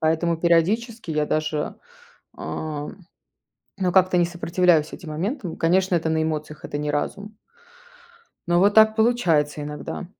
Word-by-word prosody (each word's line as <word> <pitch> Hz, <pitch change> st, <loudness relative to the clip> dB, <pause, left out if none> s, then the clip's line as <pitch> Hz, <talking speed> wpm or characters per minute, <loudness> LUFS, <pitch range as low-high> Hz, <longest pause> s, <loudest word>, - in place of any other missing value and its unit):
Поэтому, 165 Hz, +1 st, +1 dB
периодически, 190 Hz, +6 st, +1 dB
я 150 Hz, -1 st, 0 dB
даже, 155 Hz, -1 st, -2 dB, 0.6 s
э, 150 Hz, -2 st, -5 dB, 0.9 s
ну, 185 Hz, -2 st, 0 dB
как-то 185 Hz, 0 st, +4 dB
не 175 Hz, -, +4 dB
сопротивляюсь 170 Hz, -2 st, +1 dB
этим 165 Hz, -2 st, -9 dB
моментам. 180 Hz, -, -4 dB
Конечно, 185 Hz, +3 st, +2 dB
это 165 Hz, -1 st, 0 dB
на 160 Hz, 0 st, +1 dB
эмоциях, 155 Hz, -1 st, -4 dB
это 145 Hz, -, -4 dB
не 150 Hz, 0 st, -2 dB
разум. 200 Hz, +8 st, -4 dB, 1.1 s
Но 175 Hz, 0 st, +3 dB
вот 200 Hz, +3 st, +4 dB
так 220 Hz, 0 st, +6 dB
получается 165 Hz, -11 st, +2 dB
иногда. 150 Hz, +5 st, -6 dB
170 Hz, 135 wpm, -23 LUFS, 155-190 Hz, 1.1 s, так